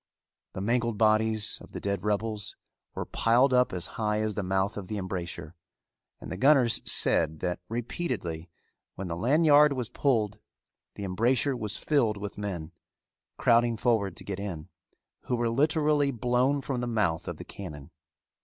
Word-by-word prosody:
The 95 - -5
mangled 120 +1 0
bodies 110 0 +2
of - - -14
the - - -4
dead 100 -2 -2
rebels 105 0 -2 0.4
were - - -3
piled 125 +4 +3
up 125 0 +4
as 90 -2 -1 0.2
high 105 0 +1
as 110 0 -1
the 105 - -2
mouth 95 +2 0
of 100 -3 -6
the 105 - -4
embrasure, 85 -4 -5 0.7
and - - -9
the 95 - -4
gunners 130 -1 +4
said 80 -1 +2
that 90 -1 -2
repeatedly 110 - -4 0.5
when 95 -2 -5
the 85 - -2
lanyard 145 - +5
was 125 -4 -3
pulled 110 -7 0 0.6
the 100 - -6
embrasure 120 +8 +1
was 105 -3 -4
filled 120 -9 +1
with 100 0 -6
men, 90 -6 -4 0.7
crowding 115 0 +3
forward 105 -6 +1
to - - -8
get 100 -1 -5
in, 90 -5 -6 0.6
who 125 - 0
were 120 -1 0
literally 150 +2 +2
blown 125 +3 +1
from 130 -3 -3
the 120 - -2
mouth 105 -9 0
of - - -4
the - - -9
cannon. 75 -6 -9
110 Hz, 165 wpm, -28 LUFS, 95-125 Hz, 0.7 s, lanyard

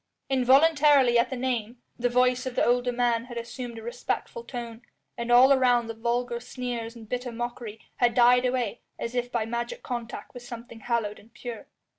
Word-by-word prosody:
Involuntarily 270 -1 +5
at 235 - +2
the 260 - -3
name, 245 -2 -2 0.2
the 245 0 0
voice 250 +1 +2
of 250 - -5
the - - +3
older 245 +1 +2
man 240 -1 +1
had 240 -1 -8
assumed 235 0 -6
a 225 - -8
respectful 245 - -4
tone, 235 - -7 0.3
and 235 0 -3
all 255 +3 +8
around 245 -3 +3
the 230 - -5
vulgar 235 +1 -1
sneers 245 -2 -5
and 225 -2 -11
bitter 250 +1 -3
mockery 235 -2 -5 0.2
had 240 -1 +2
died 245 0 +6
away 250 -4 -1 0.2
as 230 - -4
if 245 0 -2
by 230 -2 0
magic 235 - -4
contact 240 -2 -6
with 245 - -9
something 235 -1 -9
hallowed 225 -2 -2
and 220 +2 -21
pure. 240 -3 -7
245 Hz, 185 wpm, -27 LUFS, 235-250 Hz, 0.3 s, all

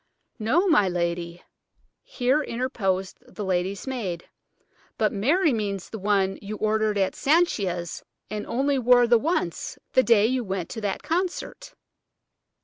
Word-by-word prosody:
"No, 280 - +2
my 210 - +4
lady," 170 0 -3 0.6
here 260 +4 0
interposed 215 -8 -2
the 210 - -8
lady's 190 +1 -1
maid; 205 -11 -4 0.7
"but - - +1
Mary 295 - +2
means 200 -4 -3
the 220 - -6
one 195 -1 +1
you 210 +1 -6
ordered 215 -1 +1
at 195 -1 +1
Sanchia's 200 - 0 0.3
and 210 -1 -5
only 275 +3 +1
wore 245 0 +5
the 235 -1 +4
once–the 260 - -1
day 225 -3 +4
you 255 +2 0
went 190 -4 -4
to 225 - -6
that 200 -2 -3
concert." 370 +8 -3
215 Hz, 135 wpm, -25 LUFS, 190-260 Hz, 0.7 s, wore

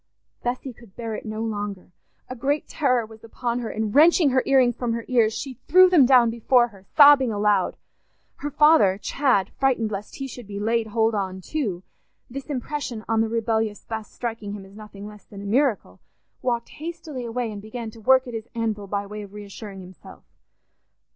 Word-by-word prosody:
Bessy 250 +1 -3
could 225 -4 -18
bear 230 -2 -5
it 215 - -6
no 215 +1 -4
longer: 205 -4 -5 0.4
a 255 - -6
great 280 +5 -1
terror 255 -6 +1
was 220 0 -15
upon 235 +1 -3
her, 235 -2 -4
and 215 -1 -3
wrenching 315 +1 +6
her 260 0 +3
ear 275 - +4
rings 245 -2 +4
from 240 -2 -2
her 230 0 -4
ears, 235 -4 +3
she 260 +1 -6
threw 370 0 +7
them 295 -8 +6
down 245 -3 +5
before 240 +1 +3
her, 195 -3 -18
sobbing 285 -4 +8
aloud. 205 -2 +1 0.6
Her 290 - -4
father, 295 -11 +5
Chad, 255 -6 +1
frightened 245 -5 +1
lest 205 +1 -6
he 275 - -5
should 245 -4 -9
be 200 -1 -6
"laid 225 +1 0
hold 225 +1 +1
on" 190 -2 -2
too, 195 - -3 0.5
this 275 +1 -7
impression 270 -4 -4
on 225 0 +2
the 225 - 0
rebellious 225 -2 -1
Bess 220 -1 -6
striking 225 -4 -5
him 200 -2 -8
as 195 +1 -16
nothing 210 -2 -10
less 210 -1 -12
than 200 - -11
a - - -8
miracle, 210 - 0 0.4
walked 235 -2 -1
hastily 320 -5 -6
away 235 -1 -3
and 205 -1 -7
began 220 +1 -7
to 225 - -14
work 260 +3 +4
at 245 - -8
his 225 0 -5
anvil 215 -3 -2
by 200 +1 -2
way 210 +1 -7
of 200 -1 -11
reassuring 205 -1 -9
himself. 185 0 -14
230 Hz, 195 wpm, -24 LUFS, 210-255 Hz, 0.6 s, sobbing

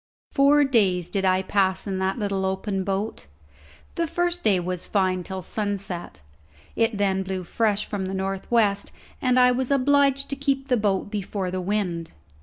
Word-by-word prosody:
Four 285 +1 +5
days 190 -10 +2
did 195 0 0
I 185 0 +3
pass 190 -1 +1
in 195 -2 -2
that 190 +3 0
little 200 -3 -1
open 190 +1 -1
boat. 195 - -3 0.7
The 335 0 -1
first 350 +2 -1
day 195 -4 +4
was 180 0 -3
fine, 185 -2 0
till 190 +1 -6
sunset; 195 - -4 0.5
it 225 -2 +1
then 195 -1 +1
blew 190 -1 -4
fresh 210 +3 0
from 195 -3 -3
the 190 - -4
north 190 0 -3
west, 210 -4 +2 0.3
and 255 -1 +3
I 250 0 +6
was 255 0 -1
obliged 280 0 +3
to - - 0
keep 275 0 -1
the 250 - +4
boat 205 -2 0
before 195 -2 -3
the 185 0 -2
wind. 180 -4 -2
200 Hz, 175 wpm, -24 LUFS, 190-250 Hz, 0.7 s, I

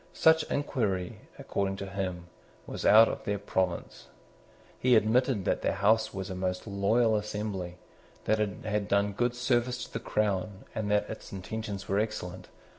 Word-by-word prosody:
Such 160 0 +5
inquiry, 105 -11 -1 0.2
according 95 -1 -2
to 100 - -5
him, 95 -3 -4 0.4
was - - -3
out 110 +2 +9
of - - -4
their 100 0 -1
province. 95 -3 -2 0.7
He 125 -1 +4
admitted 110 -1 +3
that - - +1
the - - +1
House 110 +2 +3
was 95 0 -5
a - - -4
most 90 0 -2
loyal 110 +3 +2
assembly, 105 -4 -3 0.5
that 110 0 +2
it 105 -2 -2
had 105 -1 -1
done 100 0 +2
good 120 +3 0
service 125 0 0
to - - -17
the 115 - -2
crown, 105 -2 -1
and 105 -1 -2
that 105 0 +2
its 110 - -8
intentions 100 0 -5
were 100 +1 +1
excellent. 90 -4 -4
105 Hz, 165 wpm, -29 LUFS, 95-110 Hz, 0.7 s, out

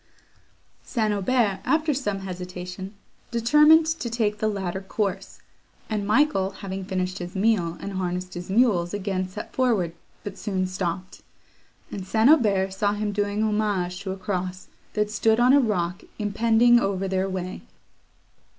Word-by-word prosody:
St. 220 -4 -1
Aubert, 205 0 +1
after 315 -1 +1
some 205 -8 -2
hesitation, 180 +1 -7 0.3
determined 300 +7 +5
to 320 -6 -2
take 215 -3 -1
the 215 - +1
latter 190 -3 -3
course, 195 0 -3 0.5
and 205 -2 -1
Michael, 215 -4 +3
having 195 0 -6
finished 185 -1 -3
his 175 +1 -7
meal, 190 -5 +1
and 200 - -6
harnessed 180 -1 -3
his 175 +1 -7
mules, 195 -5 +2
again 190 -2 -2
set 185 +3 -8
forward, 220 -10 +1 0.3
but 205 - -7
soon 190 -3 -1
stopped; 185 0 -4 0.7
and 195 -2 -6
St. 220 +7 +4
Aubert 200 -10 +3
saw 205 +1 +1
him 210 0 -2
doing 205 +1 -1
homage 205 -4 0
to 195 - -6
a 190 - -5
cross, 185 -1 -4 0.2
that 210 0 0
stood 220 +1 +2
on 250 +2 +5
a 285 - +7
rock 190 -6 -1 0.2
impending 230 +3 +4
over 195 -3 -1
their 190 0 0
way. 185 -1 -4
200 Hz, 150 wpm, -25 LUFS, 185-220 Hz, 0.7 s, a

